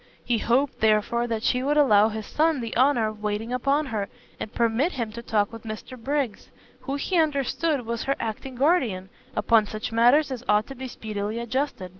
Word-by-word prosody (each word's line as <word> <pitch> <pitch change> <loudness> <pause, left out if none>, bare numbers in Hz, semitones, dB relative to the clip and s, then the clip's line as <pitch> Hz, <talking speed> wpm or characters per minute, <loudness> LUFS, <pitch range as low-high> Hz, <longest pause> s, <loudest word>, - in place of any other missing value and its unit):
He 235 -2 +1
hoped, 255 +6 +1
therefore, 220 +2 +2
that 225 -2 -3
she 250 - +2
would 290 +3 +1
allow 215 -7 +5
his 220 -1 -5
son 315 +2 +1
the 230 -2 -5
honour 250 -3 +3
of 215 -1 -10
waiting 215 +3 -2
upon 275 +4 +1
her, 215 -6 -3 0.3
and 215 - -5
permit 235 +9 +1
him 230 -4 -3
to 235 +2 -7
talk 215 -2 0
with 230 - -8
Mr 220 +3 -7
Briggs, 265 -1 -3 0.3
who 275 - -4
he 350 +6 -1
understood 295 -2 0
was 235 0 -3
her 275 - +1
acting 230 +4 -5
guardian, 245 - +1 0.3
upon 225 -3 +3
such 215 +2 -5
matters 245 +6 +4
as 250 -2 -5
ought 210 +1 +4
to 270 - -9
be 260 +1 -6
speedily 215 -2 -4
adjusted. 235 -4 -2
235 Hz, 195 wpm, -25 LUFS, 215-275 Hz, 0.3 s, allow